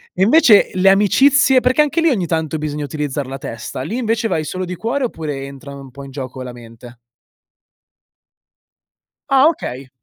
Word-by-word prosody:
E, 185 Hz, -, +1 dB
invece, 230 Hz, -3 st, +5 dB
le 185 Hz, +1 st, +3 dB
amicizie? 265 Hz, +7 st, +4 dB
Perché 255 Hz, +4 st, +2 dB
anche 300 Hz, +3 st, 0 dB
lì 330 Hz, -, +3 dB
ogni 200 Hz, -10 st, 0 dB
tanto 160 Hz, -1 st, -2 dB
bisogna 150 Hz, -1 st, -4 dB
utilizzar 145 Hz, -2 st, -4 dB
la 135 Hz, +1 st, -6 dB
testa. 115 Hz, 0 st, -7 dB
Lì 195 Hz, -, -4 dB
invece 225 Hz, -2 st, -1 dB
vai 160 Hz, -6 st, -1 dB
solo 185 Hz, +4 st, -4 dB
di 180 Hz, -, -6 dB
cuore 245 Hz, +8 st, -2 dB
oppure 150 Hz, -, -5 dB
entra, 140 Hz, 0 st, -11 dB
no, 140 Hz, -, -10 dB
un 135 Hz, -2 st, -13 dB
po' 140 Hz, +2 st, -11 dB
in 135 Hz, -, -11 dB
gioco 130 Hz, -1 st, -7 dB
la 125 Hz, -1 st, -7 dB
mente? 120 Hz, +1 st, -13 dB, 2.4 s
Ah, 270 Hz, +2 st, +5 dB
okay. 135 Hz, -, -4 dB
160 Hz, 180 wpm, -18 LUFS, -, 2.4 s, invece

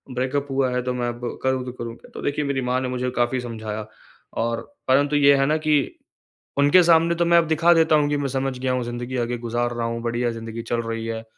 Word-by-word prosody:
Breakup 135 Hz, +3 st, -1 dB
हुआ 135 Hz, -1 st, +1 dB
है 125 Hz, 0 st, 0 dB
तो 125 Hz, 0 st, -2 dB
मैं 120 Hz, -1 st, -1 dB
अब 120 Hz, 0 st, -7 dB, 0.2 s
करूँ 130 Hz, -1 st, +1 dB
तो 125 Hz, -, -5 dB
करूँ 115 Hz, -2 st, -6 dB
क्या? -, -, -18 dB
तो -, -, -6 dB
देखिए 145 Hz, +1 st, -1 dB
मेरी 140 Hz, -1 st, -1 dB
माँ 125 Hz, 0 st, 0 dB
ने 130 Hz, -, -2 dB
मुझे 125 Hz, 0 st, -2 dB
काफ़ी 120 Hz, +1 st, +1 dB
समझाया 110 Hz, -3 st, -5 dB, 0.6 s
और 115 Hz, 0 st, -1 dB, 0.3 s
परंतु 140 Hz, +3 st, +3 dB
ये 140 Hz, -1 st, +6 dB
है 135 Hz, -, +3 dB
ना 155 Hz, +3 st, +2 dB
कि 155 Hz, -1 st, +2 dB, 0.8 s
उनके 145 Hz, +6 st, +6 dB
सामने 170 Hz, 0 st, +4 dB
तो 170 Hz, 0 st, +1 dB
मैं 170 Hz, 0 st, +5 dB
दिखा 165 Hz, +2 st, +4 dB
देता 160 Hz, -1 st, +4 dB
हूँ 145 Hz, -1 st, +2 dB
कि 145 Hz, -, +1 dB
मैं 140 Hz, -1 st, -1 dB
समझ 135 Hz, 0 st, -2 dB
गया 130 Hz, 0 st, -1 dB
हूँ 125 Hz, -1 st, -1 dB
ज़िन्दगी 120 Hz, +2 st, -4 dB
आगे 120 Hz, 0 st, -1 dB
गुज़ार 120 Hz, +1 st, -2 dB
रहा 120 Hz, -1 st, -2 dB
हूँ, 115 Hz, 0 st, -3 dB
बढ़िया 120 Hz, 0 st, -1 dB
ज़िन्दगी 115 Hz, 0 st, -6 dB
चल 115 Hz, 0 st, -1 dB
रही 115 Hz, 0 st, -4 dB
है। 115 Hz, 0 st, -4 dB
125 Hz, 245 wpm, -23 LUFS, 120-145 Hz, 0.8 s, ये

